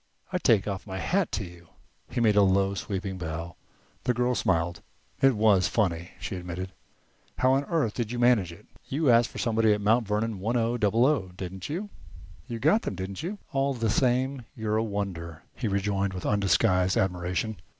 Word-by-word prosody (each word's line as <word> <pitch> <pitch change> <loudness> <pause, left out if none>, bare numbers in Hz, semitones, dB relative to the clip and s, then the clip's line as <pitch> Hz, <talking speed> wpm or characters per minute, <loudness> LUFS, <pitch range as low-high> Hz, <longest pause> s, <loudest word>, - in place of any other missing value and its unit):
I - - +1
take 105 -3 +3
off 100 0 -4
my 95 -1 -5
hat 180 - 0
to - - -1
you." 85 -2 -12 0.4
He - - -3
made 110 -3 +4
a 105 - +6
low 95 0 +3
sweeping 95 -1 -4
bow. 85 +1 -5 0.5
The 125 -1 +2
girl 125 +1 +1
smiled. 85 -6 0 0.4
"It 135 -2 +5
was 105 -5 +4
funny," 90 -5 -1
she - - -4
admitted. 90 +1 -5 0.7
"How 130 - +3
on 135 +1 +1
earth 150 -11 0
did 120 -3 -3
you 125 - -3
manage 120 -7 +3
it?" 85 - -14 0.2
"You 140 -1 +2
asked 115 0 +4
for - - -11
somebody 110 -3 +2
at 105 - -1
'Mount 110 +2 +3
Vernon 105 0 -1
one 115 +6 0
o 115 +1 +1
double 115 +1 +3
o', 135 -10 +2
didn't 95 +2 -6
you? 195 +7 -4 0.6
You 120 -2 -4
got 160 - +3
them, - - -4
didn't 95 +1 -5
you?" 190 +6 -4 0.2
"All 135 0 +1
the 115 -3 0
same, 130 +2 +1
you're 110 -1 -1
a 110 - +1
wonder!" 90 -6 -4
he 120 - -2
rejoined, 100 -1 0
with 90 - -6
undisguised 95 -2 +2
admiration. 90 +3 -1
105 Hz, 190 wpm, -27 LUFS, 95-120 Hz, 0.7 s, a